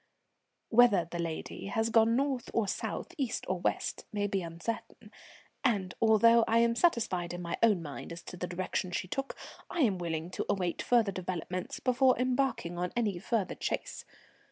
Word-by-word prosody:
"Whether 220 Hz, -7 st, +5 dB
the 175 Hz, -, -4 dB
lady 165 Hz, +3 st, -4 dB
has 225 Hz, +3 st, 0 dB
gone 225 Hz, 0 st, +5 dB
north 265 Hz, -2 st, 0 dB
or 225 Hz, -3 st, +2 dB
south, -, -, -3 dB
east 260 Hz, -4 st, -2 dB
or 185 Hz, 0 st, -1 dB
west, -, -, -2 dB
may 205 Hz, -1 st, -1 dB
be 200 Hz, -1 st, 0 dB
uncertain; 170 Hz, +6 st, -6 dB, 0.5 s
and 200 Hz, -9 st, +1 dB
although 230 Hz, +1 st, +6 dB
I 225 Hz, -, +3 dB
am 230 Hz, 0 st, +4 dB
satisfied 200 Hz, -, +1 dB
in 175 Hz, -, -6 dB
my 170 Hz, -, -2 dB
own 210 Hz, -7 st, +4 dB
mind 145 Hz, +1 st, -7 dB
as 170 Hz, 0 st, -8 dB
to -, -, -8 dB
the 180 Hz, 0 st, -4 dB
direction 185 Hz, +1 st, -2 dB
she 180 Hz, +1 st, -3 dB
took, 270 Hz, +8 st, -4 dB, 0.3 s
I 350 Hz, -, -1 dB
am 205 Hz, -9 st, +2 dB
willing 165 Hz, 0 st, -3 dB
to -, -, -3 dB
await 180 Hz, -3 st, 0 dB
further 230 Hz, -5 st, +3 dB
developments 185 Hz, -1 st, -4 dB
before 255 Hz, 0 st, +3 dB
embarking 250 Hz, -8 st, 0 dB
on 180 Hz, 0 st, -1 dB
any 210 Hz, -7 st, 0 dB
further 210 Hz, -1 st, -1 dB
chase. -, -, -3 dB
205 Hz, 175 wpm, -31 LUFS, 175-235 Hz, 0.5 s, although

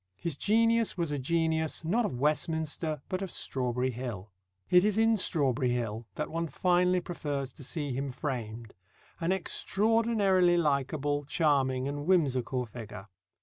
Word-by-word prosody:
His 165 Hz, +2 st, -3 dB
genius 230 Hz, +4 st, +2 dB
was 170 Hz, -4 st, -1 dB
a 145 Hz, -, -1 dB
genius, 160 Hz, +2 st, 0 dB
not 220 Hz, +8 st, +2 dB
of 125 Hz, -, -6 dB
Westminster, 155 Hz, 0 st, -1 dB
but 185 Hz, 0 st, -3 dB
of 195 Hz, -, -3 dB
Strawberry 125 Hz, -3 st, -1 dB
Hill. 115 Hz, -5 st, -6 dB, 0.4 s
It 180 Hz, 0 st, +7 dB
is 210 Hz, 0 st, +1 dB
in 225 Hz, 0 st, +4 dB
Strawberry 135 Hz, -, +1 dB
Hill 115 Hz, -2 st, -3 dB
that 150 Hz, -2 st, -3 dB
one 165 Hz, +1 st, -2 dB
finally 180 Hz, +4 st, +2 dB
prefers 145 Hz, -6 st, -4 dB
to 140 Hz, -, -11 dB
see 145 Hz, +1 st, -3 dB
him 135 Hz, +1 st, -3 dB
framed, 120 Hz, -5 st, -5 dB, 0.5 s
an 165 Hz, +2 st, 0 dB
extraordinarily 195 Hz, -1 st, +2 dB
likeable, 145 Hz, -1 st, 0 dB
charming, 135 Hz, -4 st, +1 dB
and 145 Hz, +2 st, -4 dB
whimsical 130 Hz, -8 st, +1 dB
figure. 105 Hz, -3 st, -9 dB
150 Hz, 145 wpm, -30 LUFS, 130-180 Hz, 0.5 s, It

